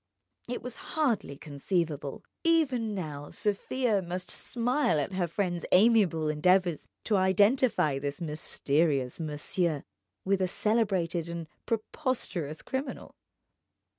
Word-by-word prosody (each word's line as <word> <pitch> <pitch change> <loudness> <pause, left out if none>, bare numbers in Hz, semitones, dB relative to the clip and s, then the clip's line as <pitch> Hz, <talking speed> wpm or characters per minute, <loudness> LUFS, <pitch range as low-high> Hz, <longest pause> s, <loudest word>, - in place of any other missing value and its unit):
It 245 - -4
was 250 -2 -6 0.2
hardly 235 - +1
conceivable; 150 -1 -2 0.2
even 265 -10 +2
now 150 -5 -5
Sofia 210 +1 0
must 180 +1 -4
smile 245 - +1
at 145 +7 -2
her 185 -2 0
friend's 175 0 -2
amiable 190 -6 +4
endeavours 175 +2 +2 0.2
to 210 - +2
identify 190 - +3
this 140 0 -4
mysterious 150 -3 0
monsieur 155 0 -1 0.4
with 195 0 +2
a 185 - +2
celebrated 185 -6 +1
and 170 -1 -4 0.2
preposterous 215 - -2
criminal. 265 0 -4
185 Hz, 105 wpm, -29 LUFS, 155-225 Hz, 0.4 s, amiable